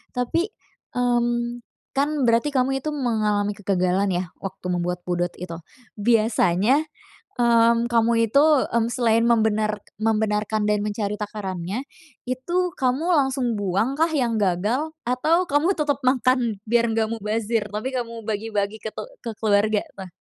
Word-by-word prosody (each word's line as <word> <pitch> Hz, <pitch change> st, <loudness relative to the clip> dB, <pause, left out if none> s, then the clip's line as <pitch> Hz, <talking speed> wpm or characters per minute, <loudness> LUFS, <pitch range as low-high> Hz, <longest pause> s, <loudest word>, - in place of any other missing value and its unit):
Tapi, 290 Hz, -, 0 dB, 0.5 s
mmm, 240 Hz, -1 st, 0 dB, 0.3 s
kan 280 Hz, +2 st, +2 dB, 0.2 s
berarti 230 Hz, +4 st, +3 dB
kamu 270 Hz, 0 st, +1 dB
itu 310 Hz, -, -1 dB
mengalami 215 Hz, -6 st, 0 dB
kegagalan 190 Hz, 0 st, +1 dB
ya 180 Hz, +1 st, 0 dB, 0.2 s
waktu 190 Hz, -1 st, -7 dB
membuat 180 Hz, 0 st, -1 dB
pudot 175 Hz, 0 st, 0 dB
itu. 170 Hz, -1 st, -6 dB, 0.4 s
Biasanya 215 Hz, -, +3 dB, 0.6 s
mmm, 235 Hz, 0 st, +4 dB
kamu 230 Hz, 0 st, +3 dB, 0.2 s
itu, 280 Hz, +6 st, +5 dB, 0.3 s
mmm, 230 Hz, -1 st, +1 dB
selain 230 Hz, -2 st, +2 dB
membenar 215 Hz, -2 st, +2 dB, 0.2 s
membenarkan 215 Hz, -1 st, +1 dB
dan 210 Hz, -1 st, +1 dB
mencari 210 Hz, -1 st, -2 dB
takarannya, 200 Hz, 0 st, -4 dB, 0.5 s
itu 260 Hz, +8 st, -2 dB, 0.2 s
kamu 260 Hz, +4 st, 0 dB
langsung 265 Hz, -4 st, +1 dB
buangkah 230 Hz, -, +1 dB
yang 245 Hz, -6 st, +1 dB
gagal? 210 Hz, -, 0 dB, 0.2 s
Atau 310 Hz, +9 st, +2 dB
kamu 295 Hz, +7 st, +3 dB
tetep 295 Hz, -2 st, +1 dB
makan 255 Hz, -4 st, +2 dB
biar 235 Hz, +1 st, +3 dB
nggak 220 Hz, -1 st, +1 dB
mubazir, 220 Hz, 0 st, -1 dB
tapi 215 Hz, +5 st, -3 dB
kamu 230 Hz, -2 st, -4 dB
bagi-bagi 210 Hz, -1 st, -2 dB
ke -, -, -3 dB
te -, -, -5 dB, 0.2 s
ke 235 Hz, -, -3 dB
keluarga 210 Hz, 0 st, +2 dB, 0.2 s
tuh? 190 Hz, -2 st, -8 dB
225 Hz, 135 wpm, -23 LUFS, 205-250 Hz, 0.6 s, itu